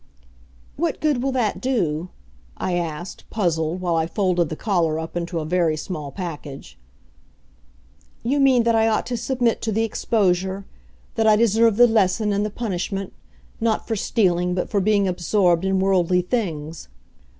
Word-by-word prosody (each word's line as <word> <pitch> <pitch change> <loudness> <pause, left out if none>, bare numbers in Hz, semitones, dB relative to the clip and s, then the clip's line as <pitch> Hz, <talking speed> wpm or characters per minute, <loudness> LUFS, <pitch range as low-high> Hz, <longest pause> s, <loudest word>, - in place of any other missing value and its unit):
"What 335 +3 -1
good 295 -5 +1
will 270 +1 0
that 240 -5 -1
do?" 180 - -1 0.5
I 185 - -2
asked, 175 0 -4
puzzled, 170 -4 -1
while 175 -2 0
I 160 0 +1
folded 180 -2 0
the 155 - -4
collar 170 -5 0
up 160 +1 -6
into 170 0 -3
a 155 - -4
very 165 -1 +1
small 150 -3 -5
package. 150 - -8 1.4
"You 270 +5 +1
mean 260 -3 +4
that 230 0 +2
I 225 0 +3
ought 220 - +1
to 250 - -3
submit 245 0 0
to 225 - -2
the 220 +2 +1
exposure 190 -3 0 0.5
that 225 -1 +1
I 215 - +6
deserve 225 0 +3
the 245 - +8
lesson 210 -2 +2
and 200 +1 0
the 210 - -1
punishment 195 -3 -4 0.5
not 225 -1 0
for 225 - -1
stealing, 180 -4 +1
but 180 - -3
for 200 - +2
being 200 0 +2
absorbed 180 0 +1
in 190 0 +1
worldly 185 -2 +2
things. 165 - -3
190 Hz, 160 wpm, -22 LUFS, 175-225 Hz, 1.4 s, the